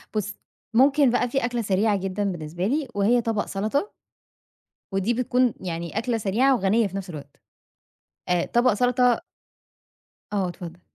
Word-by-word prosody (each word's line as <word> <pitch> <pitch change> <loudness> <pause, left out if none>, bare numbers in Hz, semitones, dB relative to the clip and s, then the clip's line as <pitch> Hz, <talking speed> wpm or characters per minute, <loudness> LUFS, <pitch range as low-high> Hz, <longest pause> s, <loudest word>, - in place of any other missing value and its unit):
بُص، 205 -1 -2 0.4
ممكن 275 +3 +5
بقى 245 0 +1
في 270 +1 0
أكلَة 240 -1 -1
سريعة 205 0 +1
جدًا 195 +1 -3
بالنسبة 170 +2 -4
لي، 285 +4 0
وهي 220 +5 +3
طبَق 225 -2 -1
سلطة. 220 - -2 1.0
ودي 195 +4 +1
بتكُون 250 0 +1
يعني 170 +1 -4
أكلَة 230 +1 0
سريعة 225 +6 +2
وغنية 215 +1 +2
في 195 0 -6
نفس 195 -1 -6
الوقت. 145 -4 -9 0.9
آآ 180 -1 +2
طبق 245 +1 +3
سلطة 245 +1 +2 1.1
آه، 195 -3 +1
اتفضل. 175 -1 -8
215 Hz, 145 wpm, -24 LUFS, 190-245 Hz, 1.1 s, ممكن